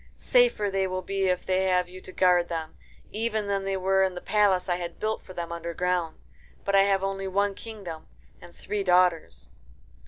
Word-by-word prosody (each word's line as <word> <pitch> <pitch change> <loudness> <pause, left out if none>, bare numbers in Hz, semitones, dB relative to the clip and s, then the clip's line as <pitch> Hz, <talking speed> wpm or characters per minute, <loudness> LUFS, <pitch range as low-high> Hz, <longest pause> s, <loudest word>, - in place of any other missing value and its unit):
Safer 485 - +3
they 195 0 0
will 185 0 -3
be 195 0 -1
if 180 -1 0
they 190 0 +1
have 180 -1 +2
you 185 +1 -11
to 185 - -10
guard 180 -2 +3
them, 165 - -4 0.4
even 220 -1 -1
than 200 -1 -1
they 195 0 -1
were 190 +1 +2
in 190 -1 0
the - - -4
palace 200 -2 +2
I 175 -1 0
had 175 -1 -6
built 220 0 -2
for 185 - -12
them 170 -1 -5
underground. 170 0 -2 0.5
But 200 - +1
I 195 - +7
have 195 -1 +1
only 195 0 -2
one 200 +1 +1
kingdom 195 -7 -8 0.3
and 170 - -14
three 210 -1 -3
daughters." 175 - +2
185 Hz, 195 wpm, -26 LUFS, 180-195 Hz, 0.5 s, I